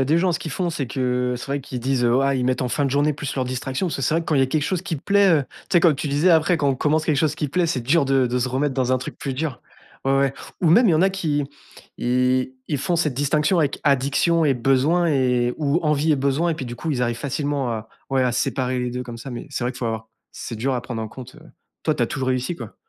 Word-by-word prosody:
a -, -, +2 dB
des 155 Hz, +5 st, +2 dB
gens, 180 Hz, +1 st, +2 dB
ce 165 Hz, -, -1 dB
qu'ils 170 Hz, -2 st, -6 dB
font, 175 Hz, +5 st, -1 dB
c'est 160 Hz, -5 st, -3 dB
que, 125 Hz, -1 st, -1 dB
c'est -, -, -8 dB
vrai 140 Hz, 0 st, -2 dB
qu'ils 125 Hz, -2 st, -6 dB
disent 130 Hz, -1 st, +1 dB, 0.2 s
ah, 140 Hz, 0 st, +2 dB
ils 130 Hz, -1 st, 0 dB
mettent 130 Hz, 0 st, 0 dB
en 125 Hz, -, -1 dB
fin 145 Hz, +4 st, 0 dB
de 135 Hz, -, 0 dB
journée 145 Hz, +2 st, +2 dB
plus 145 Hz, 0 st, -5 dB
leurs 130 Hz, -2 st, -1 dB
distractions 130 Hz, +6 st, -2 dB
parce 170 Hz, -, -2 dB
que 135 Hz, -, -5 dB
c'est 130 Hz, -, +1 dB
vrai 165 Hz, -, +2 dB
que 165 Hz, -, -8 dB
quand 155 Hz, -, +1 dB
il -, -, +3 dB
y -, -, +5 dB
a -, -, +3 dB
quelque 150 Hz, +3 st, 0 dB
chose 180 Hz, +3 st, -1 dB
qui 175 Hz, -4 st, -3 dB
plaît, 200 Hz, +7 st, +3 dB
heu, 155 Hz, -4 st, +4 dB, 0.3 s
tu -, -, +3 dB
sais? -, -, +6 dB
Comme 165 Hz, -4 st, +5 dB
tu 145 Hz, +1 st, -3 dB
disais: 145 Hz, +6 st, +2 dB
«Après, 165 Hz, +1 st, +4 dB
quand 145 Hz, -2 st, +1 dB
on 135 Hz, -, +2 dB
commence 155 Hz, +4 st, 0 dB
quelque 155 Hz, -, +2 dB
chose 150 Hz, +1 st, +1 dB
qui 150 Hz, -, -3 dB
plaît, 180 Hz, +5 st, +1 dB
c'est 150 Hz, -6 st, -1 dB
dur 140 Hz, +6 st, +2 dB
de 135 Hz, -1 st, +2 dB
de 125 Hz, +1 st, -1 dB
se 125 Hz, +1 st, 0 dB
remettre 135 Hz, +2 st, 0 dB
dans 130 Hz, -1 st, +1 dB
un 130 Hz, -, +2 dB
truc 125 Hz, -, -7 dB
plus 135 Hz, -, -3 dB
dur». 135 Hz, -1 st, -4 dB, 0.4 s
Ouais, 135 Hz, -, +2 dB
ouais 135 Hz, -1 st, +1 dB, 0.3 s
ou 170 Hz, -, +3 dB
même, 230 Hz, +10 st, +6 dB
il -, -, +5 dB
y -, -, +4 dB
en 155 Hz, -, +3 dB
a 190 Hz, -, +5 dB
qui 160 Hz, -7 st, -1 dB, 0.5 s
ils 125 Hz, +1 st, +1 dB, 0.2 s
ils 150 Hz, -, 0 dB
font 175 Hz, +6 st, 0 dB
cette 155 Hz, -5 st, 0 dB
distinction 150 Hz, +6 st, +1 dB
avec 145 Hz, -2 st, -1 dB
addiction 140 Hz, +4 st, +2 dB
et 145 Hz, -, +4 dB
besoins 135 Hz, +7 st, +2 dB
et 125 Hz, -5 st, +1 dB
ou 150 Hz, +2 st, +1 dB
envie 150 Hz, 0 st, +2 dB
et -, -, +2 dB
besoins 140 Hz, +5 st, +1 dB
et 165 Hz, -, 0 dB
puis, 135 Hz, -5 st, -6 dB
du 120 Hz, 0 st, -6 dB
coup, 160 Hz, -, -4 dB
ils 130 Hz, -, -1 dB
arrivent 120 Hz, -1 st, 0 dB
facilement 140 Hz, -1 st, -2 dB
à 110 Hz, -1 st, -5 dB, 0.2 s
ouais, 135 Hz, -1 st, +2 dB
à 125 Hz, -, +2 dB
séparer 130 Hz, +1 st, -1 dB
les 125 Hz, 0 st, -2 dB
2 125 Hz, +1 st, -4 dB
comme 120 Hz, -2 st, -8 dB
ça 115 Hz, +4 st, -8 dB
mais 120 Hz, -, -6 dB
c'est 135 Hz, -3 st, -3 dB
vrai 125 Hz, -, -1 dB
que 125 Hz, -, -11 dB
faut 120 Hz, -, -2 dB
avoir 110 Hz, 0 st, -4 dB, 0.2 s
c'est 115 Hz, -, -7 dB
dur 130 Hz, +4 st, -1 dB
à 120 Hz, -, -2 dB
prendre 120 Hz, -3 st, -5 dB
en 110 Hz, -, -4 dB
compte, 125 Hz, +3 st, -11 dB
heu, -, -, -15 dB, 0.4 s
toi, -, -, +1 dB
tu -, -, -1 dB
as -, -, +2 dB
toujours 130 Hz, -1 st, -3 dB
réussi, 130 Hz, +6 st, -1 dB
quoi? -, -, -9 dB
135 Hz, 305 wpm, -22 LUFS, 125-155 Hz, 0.5 s, sais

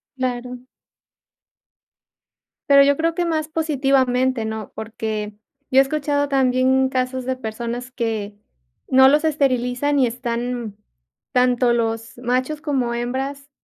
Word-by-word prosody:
Claro. 250 Hz, -1 st, -4 dB, 2.1 s
Pero, 280 Hz, 0 st, +8 dB
yo 285 Hz, 0 st, +4 dB
creo 330 Hz, +1 st, 0 dB
que 350 Hz, -, 0 dB
más 315 Hz, -2 st, -1 dB
positivamente, 265 Hz, -6 st, +1 dB
¿no?, 220 Hz, -1 st, -5 dB
porque 220 Hz, -1 st, -4 dB, 0.4 s
yo 260 Hz, -, +6 dB
he -, -, +9 dB
escuchado 285 Hz, 0 st, 0 dB
también 260 Hz, 0 st, +2 dB
casos 255 Hz, 0 st, -2 dB
de 260 Hz, 0 st, -1 dB
personas, 240 Hz, +1 st, -5 dB
que 220 Hz, -4 st, -3 dB, 0.5 s
no 265 Hz, 0 st, +6 dB
los 295 Hz, +3 st, +4 dB
esterilizan 275 Hz, -2 st, +1 dB
y 255 Hz, -, +4 dB
están 240 Hz, -2 st, -4 dB, 0.6 s
tanto 250 Hz, -1 st, +3 dB
los 225 Hz, -1 st, -2 dB
machos 255 Hz, +5 st, -1 dB
como 265 Hz, -6 st, -1 dB
hembras, 265 Hz, +4 st, -4 dB
255 Hz, 120 wpm, -21 LUFS, 240-275 Hz, 2.1 s, he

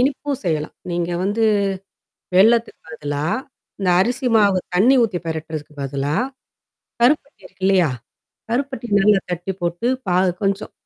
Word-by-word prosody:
இனிப்பும் 275 Hz, +1 st, 0 dB
செய்யலாம். 155 Hz, -3 st, -1 dB, 0.2 s
நீங்க 175 Hz, 0 st, -1 dB
வந்து 205 Hz, +4 st, 0 dB, 0.9 s
வெல்லத்துக்கு 225 Hz, +5 st, +4 dB
பதிலா, 145 Hz, -1 st, -4 dB, 0.5 s
இந்த 190 Hz, -2 st, +1 dB
அரிசி 245 Hz, +6 st, +1 dB
மாவு 200 Hz, -3 st, +4 dB, 0.2 s
தண்ணி 235 Hz, +9 st, +5 dB
ஊத்தி 205 Hz, -6 st, -1 dB
பெரட்டுறதுக்கு 160 Hz, -2 st, -5 dB
பதிலா, 140 Hz, +2 st, -2 dB, 0.9 s
கருப்பட்டி 280 Hz, +1 st, +2 dB
இருக்கு 185 Hz, +1 st, -13 dB
இல்லையா? 185 Hz, -6 st, +3 dB, 0.6 s
கருப்பட்டி 260 Hz, 0 st, -2 dB
நல்லா 200 Hz, 0 st, +5 dB
கட்டி 175 Hz, +2 st, -3 dB
போட்டு, 175 Hz, +6 st, -1 dB, 0.2 s
பாகு 180 Hz, +1 st, +3 dB
கொஞ்சம் 195 Hz, +1 st, -1 dB
190 Hz, 120 wpm, -20 LUFS, 165-230 Hz, 0.9 s, தண்ணி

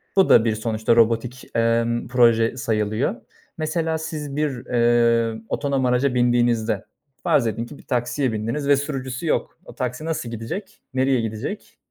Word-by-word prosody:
Bu 195 Hz, -1 st, +4 dB
da 115 Hz, -, +6 dB
bir 110 Hz, -2 st, +1 dB
sonuçta 110 Hz, +1 st, 0 dB
robotik, 115 Hz, +2 st, +2 dB
emm, 115 Hz, +1 st, +1 dB
proje 115 Hz, -1 st, +3 dB
sayılıyor. 110 Hz, -, 0 dB, 0.4 s
Mesela 160 Hz, 0 st, -1 dB
siz 155 Hz, -3 st, -5 dB
bir, 140 Hz, -4 st, -2 dB
eee, 115 Hz, -2 st, +2 dB
otonom 140 Hz, -2 st, 0 dB
araca 125 Hz, +2 st, +2 dB
bindiğinizde 120 Hz, -3 st, +2 dB, 0.4 s
farz 120 Hz, -, +3 dB
edin 115 Hz, +2 st, -2 dB
ki 140 Hz, +4 st, -11 dB
bir -, -, -16 dB
taksiye 125 Hz, +1 st, -1 dB
bindiniz 115 Hz, +7 st, -2 dB
ve 140 Hz, -1 st, +5 dB
sürücüsü 135 Hz, 0 st, -4 dB
yok. -, -, -1 dB
O -, -, -12 dB
taksi 125 Hz, +4 st, -3 dB
nasıl 160 Hz, -7 st, -3 dB
gidecek, 115 Hz, -, -6 dB
nereye 130 Hz, -1 st, +2 dB
gidecek? 115 Hz, -, -5 dB
120 Hz, 150 wpm, -22 LUFS, 115-140 Hz, 0.4 s, da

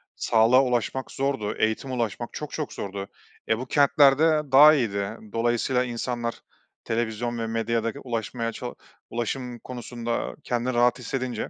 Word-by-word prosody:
Sağlığa 115 Hz, +4 st, +4 dB
ulaşmak 125 Hz, +1 st, -1 dB
zordu, 135 Hz, -6 st, -1 dB
eğitime 110 Hz, +4 st, 0 dB
ulaşmak 120 Hz, -1 st, -2 dB
çok 150 Hz, -1 st, -6 dB
çok 155 Hz, -3 st, -4 dB
zordu. 100 Hz, 0 st, -5 dB, 0.4 s
E, 110 Hz, -, +3 dB
bu 130 Hz, -, -4 dB
kentlerde 145 Hz, +2 st, +4 dB
daha 150 Hz, +3 st, +9 dB
iyiydi. 110 Hz, -5 st, -1 dB, 0.2 s
Dolayısıyla 120 Hz, +2 st, +1 dB
insanlar, 120 Hz, -1 st, -3 dB, 0.4 s
televizyon 115 Hz, +1 st, -2 dB
ve 115 Hz, -, -2 dB
medyada 115 Hz, 0 st, -1 dB
ulaşmaya 115 Hz, -1 st, -3 dB
ça 125 Hz, +1 st, -6 dB, 0.4 s
ulaşım 120 Hz, +1 st, -3 dB
konusunda 120 Hz, -1 st, -4 dB
kendini 120 Hz, +1 st, -1 dB
rahat 120 Hz, +1 st, +3 dB
hissedince 125 Hz, -1 st, -3 dB
120 Hz, 130 wpm, -25 LUFS, 115-130 Hz, 0.4 s, daha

